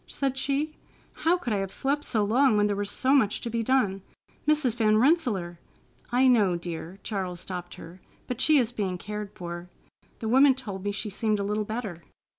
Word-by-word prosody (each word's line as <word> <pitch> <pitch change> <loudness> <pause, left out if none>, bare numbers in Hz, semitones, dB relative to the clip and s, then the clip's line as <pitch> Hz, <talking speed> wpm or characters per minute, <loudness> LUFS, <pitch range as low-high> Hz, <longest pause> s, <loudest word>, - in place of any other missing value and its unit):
said 270 -2 -2
she. 280 +3 -1 0.4
"How 340 +3 +2
could 250 -11 -3
I - - +1
have 195 -1 -3
slept 285 +2 -1
so 215 -3 +1
long 245 +2 +4
when 205 - +4
there 205 -1 +1
was 205 0 -2
so 260 +5 +2
much 225 -8 +3
to 235 - -4
be 230 0 0
done! 215 -6 +1 0.5
Mrs. 300 -6 +2
Van 215 -2 +3
Rensselaer——" 220 - +1 0.5
"I 255 +2 +4
know, 210 -8 +4
dear," 170 +1 -6
Charles 185 -4 -3
stopped 180 -2 -6
her, 175 +3 -12 0.2
"but 250 0 -4
she 310 +1 +5
is 245 -4 +2
being 195 -6 -2
cared 210 +2 -5
for. 175 0 -7 0.5
The 225 - -5
woman 265 +3 +6
told 205 -8 -7
me 205 - 0
she 210 +1 -4
seemed 215 +1 0
a - - -1
little 210 +1 -1
better. 210 -6 -5
215 Hz, 200 wpm, -27 LUFS, 195-260 Hz, 0.5 s, woman